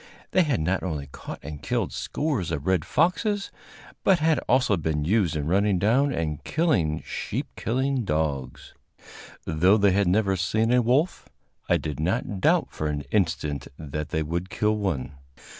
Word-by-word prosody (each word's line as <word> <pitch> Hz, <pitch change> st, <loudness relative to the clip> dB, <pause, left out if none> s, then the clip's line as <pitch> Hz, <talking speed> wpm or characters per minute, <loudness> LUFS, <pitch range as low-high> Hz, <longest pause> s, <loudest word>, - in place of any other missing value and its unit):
They 185 Hz, -, +4 dB
had 145 Hz, -, +1 dB
not 90 Hz, +4 st, 0 dB
only 75 Hz, -6 st, -3 dB
caught 70 Hz, -, -8 dB
and 75 Hz, 0 st, -7 dB
killed -, -, -1 dB
scores 140 Hz, -, -2 dB
of 70 Hz, -, -3 dB
red 95 Hz, -4 st, +1 dB
foxes, 195 Hz, +5 st, +1 dB, 0.5 s
but 190 Hz, -, +5 dB
had 160 Hz, 0 st, +2 dB
also 125 Hz, -5 st, +4 dB
been 75 Hz, -3 st, -1 dB
used 95 Hz, -3 st, +2 dB
in 75 Hz, -2 st, -2 dB
running 100 Hz, +4 st, +2 dB
down 120 Hz, +10 st, +3 dB
and 75 Hz, -, -3 dB
killing 90 Hz, -, +1 dB
sheep -, -, -3 dB
killing 130 Hz, +2 st, 0 dB
dogs. 75 Hz, -, -2 dB, 0.7 s
Though 90 Hz, +6 st, +4 dB
they 100 Hz, -2 st, +4 dB
had 100 Hz, 0 st, +2 dB
never 95 Hz, +1 st, +2 dB
seen 110 Hz, +5 st, +1 dB
a 125 Hz, -, +5 dB
wolf, 130 Hz, +9 st, +1 dB, 0.4 s
I -, -, +5 dB
did 75 Hz, -3 st, -5 dB
not 95 Hz, +4 st, -1 dB
doubt -, -, +3 dB
for 75 Hz, -, -3 dB
an 75 Hz, -1 st, -2 dB
instant 75 Hz, -8 st, 0 dB
that 75 Hz, -1 st, -5 dB
they 80 Hz, 0 st, -1 dB
would 85 Hz, +4 st, -3 dB
kill 105 Hz, +2 st, +1 dB
one. 80 Hz, -9 st, -3 dB
95 Hz, 165 wpm, -25 LUFS, 75-115 Hz, 0.7 s, but